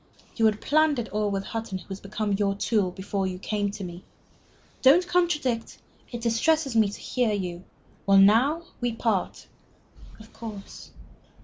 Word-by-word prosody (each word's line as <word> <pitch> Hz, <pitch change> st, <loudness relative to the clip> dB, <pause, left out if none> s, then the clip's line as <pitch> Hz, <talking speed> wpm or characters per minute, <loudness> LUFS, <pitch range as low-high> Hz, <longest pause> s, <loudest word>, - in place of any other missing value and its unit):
You 225 Hz, -, +4 dB
had 215 Hz, -1 st, 0 dB
planned 310 Hz, 0 st, +3 dB
it 235 Hz, -2 st, -3 dB
all 210 Hz, 0 st, -1 dB
with 195 Hz, -1 st, -2 dB
Hutton, 225 Hz, -3 st, -4 dB
who 185 Hz, -, -13 dB
has 195 Hz, 0 st, -6 dB
become 205 Hz, +1 st, -3 dB
your 195 Hz, 0 st, +1 dB
tool, 205 Hz, -1 st, +1 dB
before 190 Hz, +1 st, -3 dB
you 185 Hz, -1 st, -4 dB
came 205 Hz, +1 st, -2 dB
to 200 Hz, 0 st, -7 dB
me. 175 Hz, 0 st, -8 dB, 0.8 s
Don't 305 Hz, +7 st, +6 dB
contradict. 300 Hz, -11 st, 0 dB, 0.3 s
It 240 Hz, -1 st, -5 dB
distresses 260 Hz, +4 st, +1 dB
me 220 Hz, -2 st, +4 dB
to 205 Hz, -, -9 dB
hear 245 Hz, -4 st, 0 dB
you. 180 Hz, -3 st, -4 dB, 0.4 s
Well, 195 Hz, 0 st, +6 dB
now 235 Hz, +12 st, +5 dB, 0.2 s
we 245 Hz, -2 st, -1 dB
part." 225 Hz, -4 st, -1 dB, 0.7 s
"Of 220 Hz, +1 st, -15 dB
course. 215 Hz, -4 st, -9 dB
215 Hz, 165 wpm, -26 LUFS, 195-240 Hz, 0.8 s, Don't